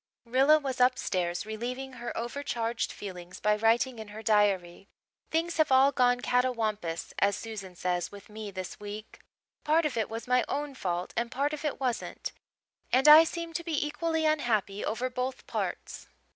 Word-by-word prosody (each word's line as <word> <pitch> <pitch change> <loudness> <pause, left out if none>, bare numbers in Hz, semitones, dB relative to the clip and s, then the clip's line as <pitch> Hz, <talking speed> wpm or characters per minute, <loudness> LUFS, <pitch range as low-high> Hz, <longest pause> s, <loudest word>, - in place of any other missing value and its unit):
Rilla 265 +6 +5
was 270 -4 -3
upstairs 185 -8 +1
relieving 250 +5 -5
her 240 -1 -5
over 240 +5 -3
charged 230 -4 -2
feelings 180 -3 -8
by 210 0 +3
writing 230 +3 +2
in 220 - -7
her 210 +2 -9
diary. 200 -4 +2 0.4
"Things 330 +1 0
have 310 -3 +3
all 265 +2 +6
'gone 245 -1 +3
catawampus,' 220 -10 -1
as 200 0 +3
Susan 200 -5 -7
says, 175 0 -1
with 200 -1 -12
me 215 0 -7
this 185 -2 -7
week. 210 +1 -8 0.4
Part 315 +2 +3
of 295 - -1
it 220 - 0
was 225 +2 -6
my 250 0 +3
own 290 0 -2
fault 180 -7 -3
and 235 0 -1
part 285 +4 -1
of 300 - -5
it 300 - -2
wasn't, 255 -3 -3 0.6
and 265 +3 +4
I 305 +2 +11
seem 335 0 -5
to 335 - -3
be 320 -3 -1
equally 320 +1 -1
unhappy 225 -10 +1
over 240 +4 -1
both 255 +1 -4
parts. - - -4
240 Hz, 170 wpm, -29 LUFS, 210-275 Hz, 0.6 s, I